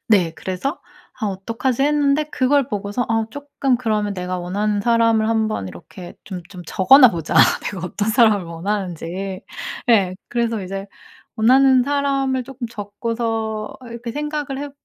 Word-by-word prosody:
네. 185 -7 +3
그래서 190 - -4 0.4
'아 215 - 0
어떡하지?' 230 +6 -2
했는데 295 0 +2
그걸 275 0 +2
보고서 205 +2 -2
'아 225 -1 +1
쪼끔 280 -2 -1
그러면 215 -4 -1
내가 180 0 -3
원하는 205 +4 -1
사람을 230 0 +3
한번 220 - 0
이렇게 175 - -11
좀 185 -3 -7
좀 180 -2 -10
적어나 250 - +7
보자. 165 -2 -4 0.3
내가 185 -3 -4
어떤 205 +4 -2
사람을 220 -4 +4
원하는지.' 185 +1 -4 0.5
예. 195 -5 +4
그래서 230 -3 -1
이제 195 +1 -5 0.5
원하는 260 +3 +5
사람을 275 -2 0
쪼끔 260 -1 -6
적고서 220 0 -3
이렇게 235 0 -6
생각을 295 -2 -3
해 290 0 -5
220 Hz, 315 characters per minute, -21 LUFS, 195-260 Hz, 0.5 s, 적어나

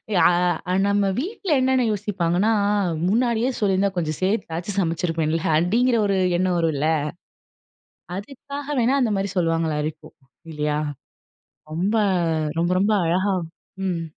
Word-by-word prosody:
யா 180 - +4 0.6
நம்ம 200 0 +2
வீட்ல 380 - -4
என்னன்னு 260 -1 +2
யோசிப்பாங்கன்னா, 195 -1 0 0.6
"முன்னாடியே 235 +3 +1
சொல்லியிருந்தா 200 -1 +2
கொஞ்சம் 155 -3 -2
சேத்தாச்சும் 190 -1 -2
சமைச்சிருப்பேன்ல." 165 -2 -1 0.2
அப்படீங்கிற 230 +9 +2
ஒரு 195 - +1 0.2
எண்ணம் 185 -1 +1
வரும் 165 -2 +1
இல்ல. 145 - 0 1.3
அதுக்காக 280 +6 -6
வேணா 255 +4 +2
அந்த 240 -4 +2
மாரி 195 0 -1
சொல்லுவாங்களா 165 -3 +1
இருக்கும், 155 0 -7 0.4
இல்லையா? 150 0 -1 0.9
ரொம்ப, 190 +7 0 0.6
ரொம்ப, 175 +1 +1
ரொம்ப 210 +2 +2
அழகா 190 +4 +1 0.5
ம். 170 -2 -2
190 Hz, 115 wpm, -23 LUFS, 165-225 Hz, 1.3 s, யா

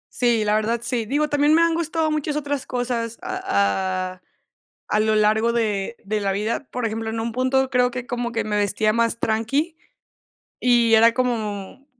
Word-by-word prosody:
Sí, 235 -3 +2
la 210 - +2
verdad 220 +2 +1
sí. 240 -3 -1
Digo, 300 +3 +1
también 290 +1 +3
me 335 - +5
han 335 0 +2
gustado 325 -1 -1
muchas 300 -1 -2
otras 285 -2 -3
cosas 240 -2 -2
a 185 - -1
a 185 - -20 0.7
a 210 - +1
lo 215 0 +2
largo 215 +2 +3
de 220 -2 -1
de 210 +1 -1
la 195 -1 0
vida. 215 +7 -2
Por 250 -2 -3
ejemplo, 220 0 -3
en 225 - -3
un 230 +1 -2
punto, 260 +2 +1
creo 250 -1 +3
que 250 0 -6
como 245 -1 -3
que 230 - -1
me 210 -1 -2
vestía 210 +1 +1
más 230 0 +1
tranqui 250 +10 0 0.8
y 240 -2 +4
era 230 +1 +6
como 230 0 -3
230 Hz, 185 wpm, -22 LUFS, 215-260 Hz, 0.8 s, era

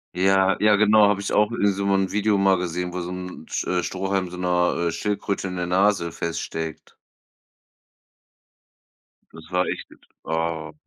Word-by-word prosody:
Ja, 95 +1 +3
ja, 105 0 +5
genau, 105 0 +5
habe 100 -1 +1
ich 100 - -3
auch 105 +1 +3
in 100 -4 +1
so 100 +1 -2
'n 95 -1 +1
Video 105 0 +2
mal 95 -1 +4
gesehen, 90 0 -3
wo 90 - -3
so 85 - -5
'n 90 -3 -7
t - - -3
äh, 90 -1 +1
Strohhalm 95 0 -2
so 90 - -9
'ner, 90 -1 +1
äh, - - -2
Schildkröte 100 +1 -2
in 90 - -5
der 90 -1 -2
Nase 95 -1 +2
feststeckt. 80 -1 -5 2.4
Das 80 -1 -12
war 90 0 +2
echt - - -5
jetzt - - -20 0.2
oh. 80 -1 -2
90 Hz, 170 wpm, -23 LUFS, 90-100 Hz, 2.4 s, ja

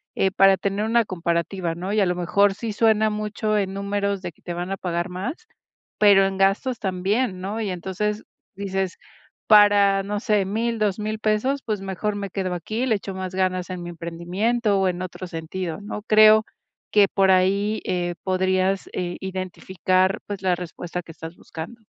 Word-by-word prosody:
eh, 190 - +2
para 195 0 +5
tener 200 +2 -1
una 235 +1 +3
comparativa, 170 0 -2
¿no?, 180 +3 -4
y 215 - +2
a 195 - +4
lo 180 - +1
mejor 195 +3 +2
sí 225 -1 -4
suena 220 0 +3
mucho 215 0 -1
en 195 -1 -1
números 200 0 -2
de 175 -2 -5
que - - -30
te 175 - -4
van 175 +2 -4
a 195 - -2
pagar 175 -1 -2
más, 235 - -5 0.5
pero 200 -2 +6
en 195 0 -4
gastos 195 +6 +2
también, 190 +2 -1
¿no?, 205 +4 -3
y 205 - -2
entonces 190 +4 -3 0.3
dices: 195 -1 -3 0.5
"Para, 205 -2 +6
no 205 +1 -3
sé, 210 -4 +2
1000, 230 +4 -1
2000 215 +1 -1
pesos, 220 +6 0
pues 215 -4 -2
mejor 195 +2 -3
me 200 -1 -4
quedo 185 -2 -2
aquí, 215 +8 -3
le 225 -4 +2
echo 195 -1 -5
más 185 0 -5
ganas 185 -1 0
en 180 -1 -5
mi 175 - -6
emprendimiento 185 +6 -1
o 190 - +2
en 180 0 -4
otro 185 0 -7
sentido", 165 +1 -5
¿no?, 210 0 -6
creo 215 0 +6 0.5
que 205 -2 +5
por 195 0 +2
ahí, 200 +3 +2
eh, 175 -1 -1
podrías, 185 +1 0
eh, 175 -1 -3
identificar 185 0 -1
pues 200 -2 -5
la 185 -2 +2
respuesta 175 0 -6
que 165 - -11
estas 160 +2 -9
buscando. 170 +9 -9
195 Hz, 185 wpm, -23 LUFS, 185-210 Hz, 0.5 s, pero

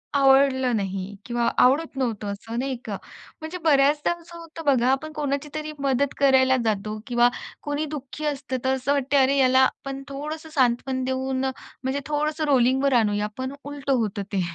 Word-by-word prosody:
आवडलं 270 -2 +4
नाही 195 -1 -3
किंवा 240 -1 0
आवडत 275 +4 +3
नव्हतं 230 -6 -2
असं 225 +4 -6
नाही 270 0 -2
का. 205 -3 -4 0.4
म्हणजे 320 +3 -5
बऱ्याचदा 295 0 +3
असं 340 0 -12
होतं 330 -1 -10
बघा, 255 -3 +3
आपण 310 +4 -1
कोणाची 290 -1 -2
तरी 310 0 -4
मदत 275 0 +1
करायला 260 -1 +4
जातो 215 0 -1
किंवा 240 -1 +4 0.4
कोणी 290 +1 -2
दुःखी 295 0 -6
असतं, 270 -3 -2
तर 265 - +3
असं 265 +2 0
वाटतं, 280 0 +1
अरे 265 +1 +3
याला 260 -1 +5
आपण 275 +1 -2
थोडंसं 305 +3 -6
सांत्वन 260 -2 +1
देऊन 260 0 -1
म्हणजे 265 +1 -4
थोडंसं 300 +1 -1
रोलिंगवर 265 0 +3
आणूया. 210 -3 +2
पण 260 +1 -4
उलटं 280 -1 -2
होतं 215 -4 -1
ते. 195 - +1
265 Hz, 165 wpm, -24 LUFS, 250-290 Hz, 0.4 s, याला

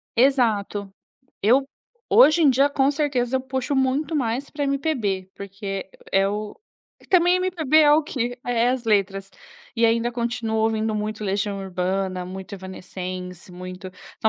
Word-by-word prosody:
Exato. 220 -6 +2 0.5
Eu 255 +7 +4 0.4
hoje 345 -9 +6
em 295 - +6
dia, 275 +3 +4
com 275 -1 +2
certeza, 265 -4 0
eu - - -5
puxo 265 +2 -2
muito 270 +4 0
mais 255 0 -1
para 290 -1 -3
MPB, 260 - -1
porque 195 0 -6 0.2
é 195 0 +3
o 210 - -4 0.4
e - - -19
também 360 0 +4
MPB 340 -5 +1
é 295 -1 +6
o 310 +1 +3
quê? 245 -3 -3
É 240 -1 +2
as 255 -1 -1
letras, 195 -2 0 0.4
e 230 0 +3
ainda 230 +1 +2
continuo 235 -2 -2
ouvindo 220 0 +1
muito 215 0 -3
Legião 200 0 -1
Urbana, 185 0 -2
muito 190 +2 -8
Evanescence 185 -1 -7
muito 185 +1 -8 0.3
então - - +1
230 Hz, 150 wpm, -23 LUFS, 195-270 Hz, 0.5 s, hoje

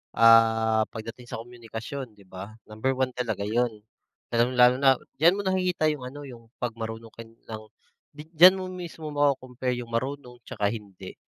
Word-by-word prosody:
ah, 115 -1 +5
pagdating 115 +2 -9
sa 115 - -6
komunikasyon, 120 +1 -8
di 100 - -18
ba? 100 +4 -9
Number 110 +5 -2
1 130 -1 0
talaga 110 -5 -2
yun, 115 -1 -1 0.5
lalong-lalo 125 +1 +4
na 135 -1 +5 0.2
diyan 170 +4 +5
mo - - 0
nakikita 185 -4 +1
yung 145 -4 -6
ano, 145 +3 -9
yung 115 -3 -13
'pag 120 - -2
marunong 115 0 -6
ka 115 - -9
ng 110 -1 -10 0.5
diyan 165 +5 +6
mo 185 - -4
mismo 165 -4 -7
mako-compare 130 -3 0
yung 120 -1 -8
marunong 125 0 -4
tsaka 100 -1 -1
hindi. 100 -4 -9
120 Hz, 160 wpm, -26 LUFS, 110-140 Hz, 0.5 s, diyan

